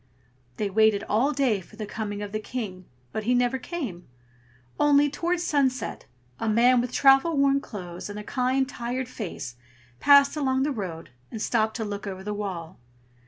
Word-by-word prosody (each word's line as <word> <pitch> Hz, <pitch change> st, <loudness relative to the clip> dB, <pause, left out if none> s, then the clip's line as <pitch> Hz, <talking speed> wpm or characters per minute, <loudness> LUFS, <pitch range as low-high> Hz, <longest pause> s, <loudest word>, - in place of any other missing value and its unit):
They 210 Hz, -, 0 dB
waited 210 Hz, 0 st, +3 dB
all 240 Hz, +8 st, +2 dB
day 260 Hz, -8 st, +1 dB
for 200 Hz, -, -17 dB
the 215 Hz, -1 st, -5 dB
coming 205 Hz, -1 st, -4 dB
of 205 Hz, -, -6 dB
the 215 Hz, -, -2 dB
King, 210 Hz, -5 st, -6 dB, 0.3 s
but 215 Hz, -, -4 dB
he 250 Hz, +2 st, +3 dB
never 245 Hz, +1 st, +1 dB
came; 250 Hz, -, -5 dB, 0.7 s
only, 290 Hz, -1 st, +4 dB
towards 345 Hz, +3 st, -1 dB
sunset, 265 Hz, -7 st, 0 dB, 0.3 s
a 225 Hz, -, -1 dB
man 240 Hz, +3 st, +5 dB
with 245 Hz, 0 st, -4 dB
travel 275 Hz, +4 st, +5 dB
worn 275 Hz, 0 st, +3 dB
clothes, 180 Hz, -5 st, -7 dB
and 205 Hz, -, -6 dB
a 210 Hz, -, -6 dB
kind, 260 Hz, +3 st, 0 dB
tired 245 Hz, 0 st, -4 dB
face 180 Hz, -, -6 dB, 0.4 s
passed 280 Hz, 0 st, +6 dB
along 265 Hz, -3 st, +1 dB
the 295 Hz, -, 0 dB
road, 180 Hz, -, -5 dB, 0.2 s
and 225 Hz, -, -6 dB
stopped 220 Hz, 0 st, +1 dB
to 225 Hz, -, -2 dB
look 205 Hz, 0 st, -5 dB
over 190 Hz, -1 st, -6 dB
the 210 Hz, +1 st, -3 dB
wall. 190 Hz, -4 st, -5 dB
230 Hz, 175 wpm, -26 LUFS, 205-270 Hz, 0.7 s, passed